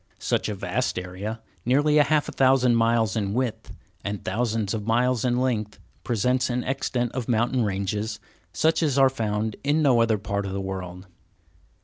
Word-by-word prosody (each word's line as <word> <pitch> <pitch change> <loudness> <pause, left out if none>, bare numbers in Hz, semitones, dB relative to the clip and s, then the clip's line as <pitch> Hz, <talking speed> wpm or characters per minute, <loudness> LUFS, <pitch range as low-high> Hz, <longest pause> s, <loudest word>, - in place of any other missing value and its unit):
Such - - -1
a 105 - -3
vast 100 +7 -2
area, 95 +5 -5 0.2
nearly 145 +5 +3
half 150 0 +3
a - - -4
thousand 130 -2 +4
miles 115 -3 +2
in 100 -2 -1
width, 125 -3 -2 0.3
and 100 -1 -4
thousands 110 0 -1
of 105 -1 -4
miles 120 +1 +2
in 125 -1 +1
length, 110 -5 -1 0.3
presents 125 +3 +1
an 125 0 -1
extent 125 -3 -1
of 125 -2 -4
mountain 120 +2 +2
ranges 105 +2 -2 0.3
such 160 - +2
as 145 -4 +1
are 135 -1 +5
found 110 -3 -2
in 150 +3 +2
no 125 -5 +4
other 115 -2 +2
part 100 0 -3
of 95 - -5
the 100 - -2
world. 95 -1 -6
115 Hz, 170 wpm, -25 LUFS, 105-130 Hz, 0.3 s, are